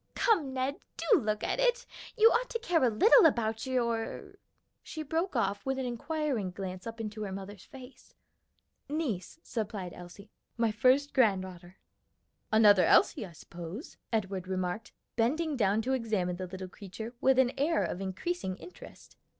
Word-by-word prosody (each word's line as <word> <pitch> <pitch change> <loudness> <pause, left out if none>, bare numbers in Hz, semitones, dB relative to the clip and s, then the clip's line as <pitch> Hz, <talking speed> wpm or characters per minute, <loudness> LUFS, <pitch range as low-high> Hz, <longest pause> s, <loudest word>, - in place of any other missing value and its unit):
"Come, 350 - +2
Ned, 265 +2 -2 0.2
do 440 -7 +4
look 215 -3 -2
at - - -1
it. - - +2 0.3
You 450 +1 +7
ought - - +1
to 465 - -2
care 355 - +1
a 250 - +5
little 410 - +6
about 225 -4 -1
your 235 -3 -2 0.2
" - - -48
She 315 - -6
broke 325 +3 -2
off 200 -4 0
with 270 0 -1
an 265 - -2
inquiring 250 - -2
glance 185 +1 -6
up 230 0 -7
into 215 -1 -5
her 205 -2 -4
mother's 195 0 -8
face. 260 -1 -14 0.7
"Niece," 290 - -3
supplied 205 -5 -4
Elsie, 180 +4 -12 0.3
"my 230 -2 +2
first 260 +6 +3
granddaughter." 190 -7 0 0.7
"Another 210 -3 +6
Elsie, 205 - +4
I 170 - -14
suppose," 175 - -9
Edward 195 -4 -2
remarked, 185 +3 -3 0.3
bending 295 +7 +1
down 215 -2 +2
to 260 +3 0
examine 210 -8 -1
the 185 0 -5
little 185 +1 -7
creature 205 +5 -8
with 265 -1 +4
an 260 -2 +4
air 310 +4 +1
of 180 - -3
increasing 190 - -3
interest. 360 - -13
225 Hz, 160 wpm, -30 LUFS, 195-275 Hz, 0.7 s, You